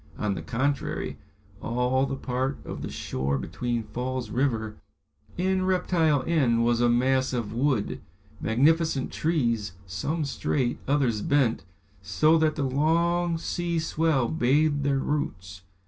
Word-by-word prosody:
On 105 -2 -1
the - - -5
contrary, 135 +4 -2 0.4
all 125 +3 +1
the 135 - -3
part 130 +1 -2
of - - -6
the - - -4
shore 70 +2 -2
between 115 - -3
Falls 125 +1 -4
River 115 -5 -1 0.6
and 185 +1 +1
Reptile 165 -6 +2
End 125 -8 +2
was 120 0 +2
a 120 - +4
mass 130 +2 +2
of 115 -4 -2
wood, 125 -3 0 0.4
magnificent 145 +4 +2
trees, 120 - 0
some 145 - -2
straight, 130 -2 -1
others 130 -6 +1
bent, 135 -8 +1 0.4
so 100 - +3
that 155 -1 +2
the 145 - -1
long 165 +5 +1
sea 170 +1 -2
swell 160 -5 +1
bathed 145 +1 +2
their 140 0 +2
roots. 95 - -3
130 Hz, 130 wpm, -26 LUFS, 115-155 Hz, 0.6 s, a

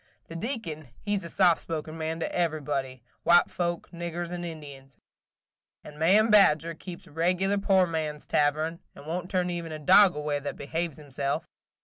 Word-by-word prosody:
The 165 - -8
Deacon 170 - -5
he 205 0 -1
's 195 - -2
a 170 - -7
soft 175 -1 +3
spoken 155 -1 -5
man 160 0 -3
to - - -3
everybody, 145 -7 -2
– - - -41
white 175 +1 +5
folks, 175 -1 -3
niggers, 170 0 -5
and 175 0 -4
Indians, 140 -5 -9 0.4
– - - -67
and 150 0 -12
Ma'am 205 +7 +4
Badger 170 -5 +5
keeps 175 +2 -10
regular 180 +6 +1
poor 190 -2 +4
man's 155 -3 -3
tavern, 155 +3 +1 0.2
and - - -12
won't 175 +3 -4
turn 180 -2 0
even 170 -2 -4
a 155 - -4
dog 185 +4 +6
away 150 -1 -1
that 145 - -5
behaves 165 +2 -3
himself. 145 +1 -3
165 Hz, 175 wpm, -27 LUFS, 150-180 Hz, 0.4 s, dog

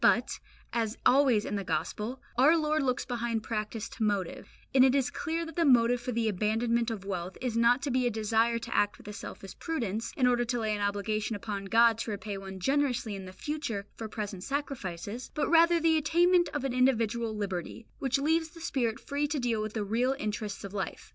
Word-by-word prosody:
But, - - +3 0.3
as 225 -1 -1
always 255 -5 +5
in 205 - -2
the 200 - -3
Gospel, 225 +6 -3
our 290 +7 +6
Lord 310 -1 +1
looks 255 -2 0
behind 235 -2 -2
practice 215 0 -3
to 225 - -4
motive; 210 +5 -1 0.2
and 260 -1 +7
it 260 0 +5
is 270 -2 +1
clear 335 0 -2
that 325 - -9
the 340 - +2
motive 245 -4 +4
for 250 - -3
the 230 -1 0
abandonment 225 +4 +1
of 210 -4 -5
wealth 185 -2 -4
is 250 -3 -2
not 235 +3 +4
to 280 - -1
be 255 0 +2
a - - +2
desire 225 +1 +1
to 230 - -5
act 205 0 +2
with - - -15
a 210 - -6
selfish 195 -1 -9
prudence, 230 -9 -2
in 255 - +3
order 245 -1 +3
to 240 0 -1
lay 215 -1 0
an 205 - -4
obligation 205 +2 -1
upon 205 -1 -4
God 225 +2 +4
to 225 - -3
repay 205 0 -4
one 195 -1 -7
generously 260 -1 +1
in 195 -1 -6
the 185 - -8
future 225 -2 -4
for 225 - -5
present 205 -4 -5
sacrifices, 235 -5 -4
but 300 - +1
rather 335 0 +6
the 325 -1 +3
attainment 345 +3 +3
of 295 -3 -3
an 270 -2 -1
individual 235 -3 +1
liberty, 200 +1 -4
which 270 0 +1
leaves 320 +3 +1
the 330 - -14
spirit 250 -8 -1
free 285 +1 -2
to 290 +1 -2
deal 240 -4 0
with 215 0 -4
the 220 - -1
real 240 +6 +1
interests 210 -4 -4
of 200 0 -7
life. 195 -3 -4
235 Hz, 215 wpm, -30 LUFS, 210-270 Hz, 0.3 s, and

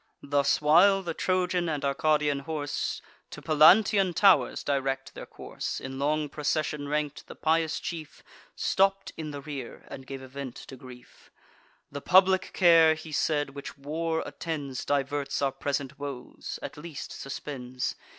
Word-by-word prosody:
Thus 140 0 +2
while 180 +6 +5
the 170 -2 -3
Trojan 180 -1 0
and 150 -3 -2
Arcadian 150 0 +1
horse 145 0 -3 0.3
To - - -9
Pallantean 180 +4 +5
tow'rs 195 -2 +4
direct 135 -1 -2
their - - -9
course, - - -6
In 135 0 -7
long 150 +2 0
procession 150 0 -2
rank'd, 150 0 -2
the - - -10
pious 160 0 +1
chief 160 -3 -7 0.3
Stopp'd 195 0 +1
in 155 -1 -5
the 145 -1 -6
rear, 140 -4 -8
and 130 0 -9
gave 135 -1 -7
a - - -9
vent 135 -1 -7
to 135 - -10
grief: 125 -1 -15 0.6
"The 145 - -6
public 190 +2 +4
care," 165 -3 +6
he 155 0 -10
said, 145 -1 0
"which 140 0 -8
war 160 +3 -2
attends, 145 -6 -5
Diverts 140 0 -1
our 140 -1 +1
present 140 -1 -3
woes, 140 -3 -6
at - - -7
least 150 -1 -7
suspends. 130 -2 -5
150 Hz, 150 wpm, -28 LUFS, 140-165 Hz, 0.6 s, care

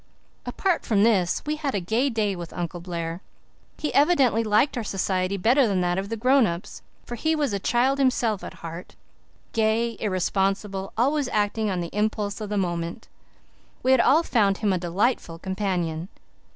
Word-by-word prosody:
Apart 375 -4 0
from 205 -3 +2
this 195 -6 +2
we 305 +1 -2
had 285 -5 -2
a - - +1
gay 225 +10 0
day 215 -5 0
with 170 -2 -7
Uncle 175 0 -4
Blair. 170 0 -5 0.6
He 300 - -3
evidently 275 -7 +4
liked 215 +7 +2
our 240 - -2
society 190 -1 -1
better 245 +7 +4
than 195 -3 0
that 175 +1 0
of 195 +1 -5
the 225 - -3
grown 255 +1 +4
ups, 170 +1 -6 0.2
for - - -7
he 315 +7 0
was 290 -8 0
a 200 - -1
child 255 +7 +1
himself 240 -6 +1
at - - -8
heart, 165 +2 -8 0.6
gay, 225 +1 +1
irresponsible, 195 0 -1
always 280 +4 +2
acting 210 -1 0
on 185 -2 -1
the 170 - -6
impulse 210 0 -1
of 210 - -5
the 210 - -1
moment. 175 +1 -3 0.7
We 260 - +4
all 280 +5 +4
found 205 -9 +2
him 205 -3 +1
a 185 - 0
delightful 175 0 -1
companion. 180 -3 -2
210 Hz, 175 wpm, -25 LUFS, 185-240 Hz, 0.7 s, evidently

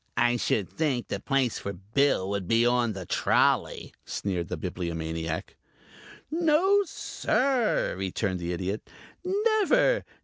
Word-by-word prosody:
"I 120 0 +3
should 105 -4 0
think 140 -7 -2
the - - -2
place 135 -4 0
for 100 - -5
Bill 105 +2 +1
would 100 -3 -2
be 115 +3 +3
on 120 -2 +2
the 95 -2 -7
trolley," - - +1
sneered 90 -4 -3
the - - -4
Bibliomaniac. 80 -2 -4 0.8
"No, 340 +5 +3
sir," 260 -6 0
returned 95 0 -2
the 85 0 -3
Idiot. 95 +4 -4 0.3
"Never. 435 +5 +2
115 Hz, 125 wpm, -27 LUFS, -, 0.8 s, I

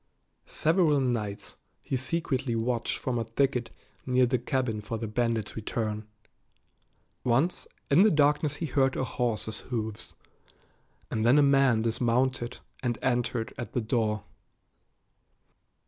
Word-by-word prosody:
Several 160 -3 +2
nights 115 -6 -2 0.3
he - - -2
secretly 130 -2 -1
watched 115 +1 -1
from 125 -2 -2
a - - 0
thicket 125 +1 0 0.3
near 125 0 +3
the 125 0 +1
cabin 120 -3 -1
for 115 +2 -4
the 115 - -4
bandit's 110 -2 -1
return. 110 -1 -3 1.2
Once 135 +9 +1 0.2
in 150 +6 +7
the 215 - +7
darkness 145 -1 +2
he 165 - -3
heard 135 -2 +2
a - - 0
horse's 115 -3 -2
hoofs, 110 -4 -5 1.0
and 110 - 0
then 120 +5 +5
a 145 - +6
man 135 -5 +4
dismounted 120 +2 0 0.2
and 120 -2 -1
entered 120 -2 0
at 120 - -6
the 125 - 0
door. 110 -2 0
120 Hz, 130 wpm, -28 LUFS, 115-135 Hz, 1.2 s, in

